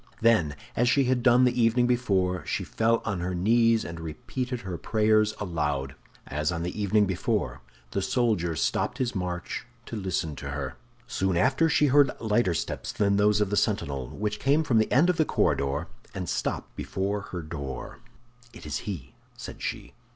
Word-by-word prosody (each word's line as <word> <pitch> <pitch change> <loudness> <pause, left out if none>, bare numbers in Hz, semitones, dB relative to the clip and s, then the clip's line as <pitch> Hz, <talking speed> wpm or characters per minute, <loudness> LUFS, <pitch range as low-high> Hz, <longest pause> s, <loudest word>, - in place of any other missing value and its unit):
Then, 110 -11 +3 0.2
as 120 +1 +3
she 140 +2 +4
had 125 -1 +1
done 125 +1 +5
the 125 -1 +2
evening 115 +2 +4
before, 95 -8 +1
she - - -1
fell 115 +1 +1
on 100 -5 -1
her 90 +1 -2
knees 115 +4 +3
and 85 0 -6
repeated 120 - -4
her 95 -2 -5
prayers 110 +2 +2
aloud. 75 -7 -2 0.3
As 75 +3 -1
on 85 -1 -3
the 90 +4 -4
evening 105 +1 +3
before, 75 -8 -1 0.3
the - - -1
soldier 105 -9 +1
stopped 125 - 0
his 130 -3 -1
march 90 -3 -3 0.2
to - - -6
listen 90 -6 -2
to 70 - -6
her. 70 -3 -4 0.3
Soon 95 -2 0
after 135 - +3
she 150 - +4
heard 140 0 +5
lighter 105 -5 +1
steps - - -3
than 100 -1 +2
those 105 0 +3
of 105 -1 0
the - - +1
sentinel, 70 -9 0
which 105 0 -3
came 145 +4 +3
from 120 -7 +3
the 110 - +1
end 145 +7 +5
of 180 -2 +2
the 155 - +4
corridor 70 - 0 0.3
and 90 -2 -4
stopped - - -3
before 100 +2 -2
her 90 -2 -4
door. 70 -5 -6 0.5
"It - - -12
is 75 -4 -2
he," 70 -11 -6 0.2
said - - -8
she. - - -4
100 Hz, 180 wpm, -27 LUFS, 85-120 Hz, 0.5 s, done